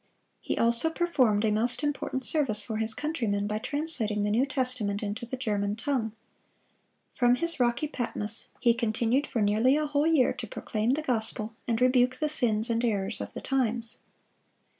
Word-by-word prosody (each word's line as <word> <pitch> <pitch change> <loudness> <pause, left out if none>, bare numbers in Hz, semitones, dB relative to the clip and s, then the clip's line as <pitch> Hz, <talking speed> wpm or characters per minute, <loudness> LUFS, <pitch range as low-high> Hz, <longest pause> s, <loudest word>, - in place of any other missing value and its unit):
He - - -4
also 235 +6 +3
performed 255 -11 +1
a 215 - +1
most 235 +7 -1
important 280 -3 -3
service 235 -10 +3
for 215 +1 -4
his 220 0 +5
countrymen 230 -10 -2
by 210 +1 -2
translating 235 -7 0
the 205 - 0
New 245 +6 +2
Testament 250 -7 -1
into 210 +3 -5
the 260 - -5
German 205 -4 -2
tongue. 235 -3 -2 1.0
From 245 -1 +3
his 335 +2 -2
rocky 245 +4 +1
Patmos 230 -5 +1
he 235 -2 +3
continued 230 +4 0
for 225 - -1
nearly 220 +7 +3
a 305 - 0
whole 295 +1 0
year 310 -6 +3
to 240 -3 -7
proclaim 215 +2 -3
the 295 +4 0
gospel, 225 -3 -3
and 230 -2 0
rebuke 250 0 +3
the 305 +3 -2
sins 230 -5 +1
and 230 +1 0
errors 205 -2 -1
of - - -8
the - - -6
times. 235 -4 -1
235 Hz, 175 wpm, -27 LUFS, 215-270 Hz, 1.0 s, his